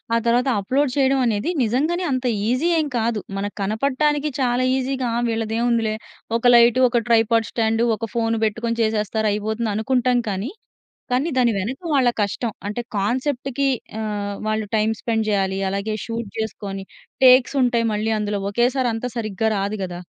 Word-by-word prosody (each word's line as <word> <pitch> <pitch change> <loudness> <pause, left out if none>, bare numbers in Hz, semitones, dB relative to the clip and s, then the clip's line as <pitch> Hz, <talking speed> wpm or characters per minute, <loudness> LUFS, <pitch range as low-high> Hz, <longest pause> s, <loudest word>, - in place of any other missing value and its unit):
ఆ - - +4
తరువాత 245 +3 +2
అప్‌లోడ్ 260 +7 0
చేయడం 270 0 +3
అనేది 220 +4 0
నిజంగానే 300 +11 0
అంత 255 -1 -1 0.2
ఈజీ 255 +7 +1
ఏం 310 - 0
కాదు. 225 -1 0 0.2
మనకు 205 +1 -4
కనపడటానికి 280 +8 0
చాలా 250 -1 +1
ఈజీగా 260 -1 -2 0.2
వీళ్ళది 225 -1 -2
ఏముందిలే 230 -2 +1 0.4
ఒక 235 - -10
లైట్, 235 +1 +6
ఒక 240 -1 +1
ట్రైపాడ్ 225 -1 +3
స్టాండ్, 225 0 +1
ఒక 225 +1 -5
ఫోన్ 230 -1 0
పెట్టుకొని 230 +2 -2
చేసేస్తారు 220 0 0
అయిపోతుంది 215 +2 -2
అనుకుంటాం 250 +2 +1
కానీ. 200 +7 -3 0.6
కానీ 260 +6 +1
దాని 240 -2 +3
వెనక 240 +8 -4
వాళ్ళ 260 -3 +4
కష్టం 215 +3 -2
అంటే 210 +4 -3 0.2
కాన్సెప్ట్‌కి 260 +5 -1 0.3
ఆహ్, 205 -2 -3
వాళ్ళు 215 0 -1
టైమ్ 220 +1 +1
స్పెండ్ 225 -2 -1
చేయాలి. 195 -1 0
అలాగే 200 +3 -2
షూట్ 230 -1 -4
చేసుకొని 200 -3 -4 0.4
టేక్స్ 255 +1 +6
ఉంటాయి 235 -2 +2
మళ్ళీ 215 +1 -1
అందులో. 205 -1 -2
ఒకేసారి 245 +3 +1
అంత 225 +2 -3
సరిగ్గా 220 -1 -1
రాదు 200 +2 -2
కదా! 175 -1 -6
230 Hz, 155 wpm, -22 LUFS, 215-250 Hz, 0.6 s, లైట్